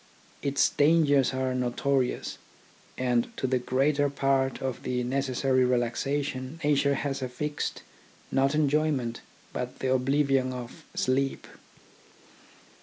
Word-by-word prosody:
Its 140 0 +3
dangers 145 -3 +4
are 130 -1 -1
notorious, 125 +1 -1 0.6
and 125 -2 +1
to - - -1
the 130 -1 +1
greater 140 +3 +1
part 135 -1 +1
of 130 -3 -3
the 125 -1 -1
necessary 130 0 +1
relaxation 130 +3 -1
nature 140 -1 +3
has 140 0 -2
affixed, 145 +4 -3 0.5
not 135 +2 +2
enjoyment, 145 -5 +1 0.3
but 125 0 -4
the 130 0 0
oblivion 135 0 +2
of 125 -1 -8
sleep. 135 +1 0
135 Hz, 110 wpm, -28 LUFS, 125-140 Hz, 0.6 s, dangers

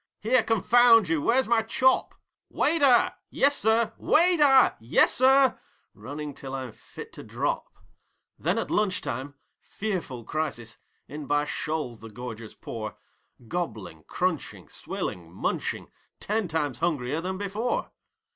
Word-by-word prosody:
'Here, 235 +3 +3
confound 225 -2 +5
you, 165 -2 +1
where's 255 - +2
my 230 -1 +3
chop?' 255 +4 +2 0.3
'Waiter!' 285 -6 +3 0.2
'Yessir!' 230 -5 +2
'Waiter!' 300 -6 +5
'Yessir!!' 260 - +4 0.3
running 145 +6 -7
till 135 0 -7
I'm 130 -3 -5
fit - - -12
to - - -9
drop. - - -3 0.7
Then - - 0
at - - -3
lunch 205 -3 +1
time 140 +1 -5 0.2
fearful 180 - -5
crisis! 125 -6 -4 0.3
In 150 -1 -8
by 145 0 +1
shoals 150 -6 -3
the 115 - -10
gorgers 115 0 -8
pour, 110 -2 -7 0.5
Gobbling, 110 - -5
crunching, - - -3
swilling, 85 -2 -6
munching 90 - -3 0.3
ten 215 -1 -1
times 150 -6 -2
hungrier 150 -3 -1
than 185 +2 -3
before. 205 +5 -2
165 Hz, 120 wpm, -26 LUFS, -, 0.7 s, confound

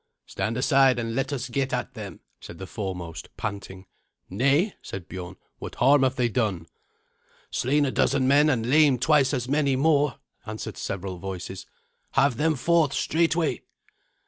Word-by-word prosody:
"Stand 115 +2 -3
aside 135 -1 +4
and 115 -1 -3
let 135 +4 -1
us 130 -3 -3
get 135 +2 -2
at - - -3
them," - - -9 0.2
said 85 - -11
the 95 - -7
foremost, 90 -5 -6
panting. 100 -3 -6 0.5
"Nay," 140 - +2
said 95 -3 -8
Biorn; 95 0 -7 0.2
"what - - -7
harm 135 +3 +4
have 130 -1 +2
they 125 -2 +1
done?" 105 -8 -1 0.9
"Slain 145 +3 +1
a 135 - -1
dozen 130 -1 +1
men 145 +3 +5
and 120 -5 0
lamed 140 -3 +4
twice 145 -4 +4
as 125 -4 -2
many 140 -1 +1
more," 145 -2 +2 0.3
answered 110 0 -7
several 95 -2 -5
voices; 95 0 -7 0.5
"have 135 -3 +3
them 155 +2 +2
forth 155 +2 +2
straightway." 165 0 +1
130 Hz, 155 wpm, -25 LUFS, 100-145 Hz, 0.9 s, men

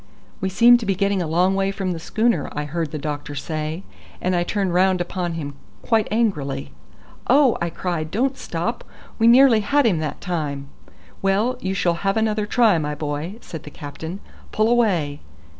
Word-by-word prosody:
"We 190 - -1
seem 240 +5 +6
to 230 - -5
be 195 - +2
getting 200 0 +1
a 170 - -2
long 180 +4 +2
way 195 0 +1
from 195 -2 -2
the 170 - -4
schooner," 220 -2 0
I 150 - -2
heard 160 +1 -3
the 155 - -5
doctor 145 0 -5
say, 155 +4 -4 0.4
and 185 0 0
I 175 - +2
turned 190 0 -1
round 185 +1 +3
upon 175 -1 -3
him 145 -3 -5 0.3
quite 225 -3 +2
angrily. 150 -12 -1 0.6
"Oh!" 275 -4 +5
I 170 - 0
cried, 165 -2 -3
"don't 260 - 0
stop. 230 0 -3 0.4
We 225 - +4
nearly 245 -1 +7
had 280 +7 +2
him 190 -8 +2
that 155 -2 -4
time." 145 -6 -3 0.5
"Well, 205 +6 +1
you 190 -2 -2
shall 175 -3 +2
have 195 +1 +1
another 215 -1 0
try, 220 -6 +4
my 150 -1 -3
boy," 150 +5 -4
said 160 - -8
the - - -10
captain. 160 +6 -8 0.3
"Pull 215 +1 +2
away." 180 -12 +1
185 Hz, 185 wpm, -22 LUFS, 155-215 Hz, 0.6 s, nearly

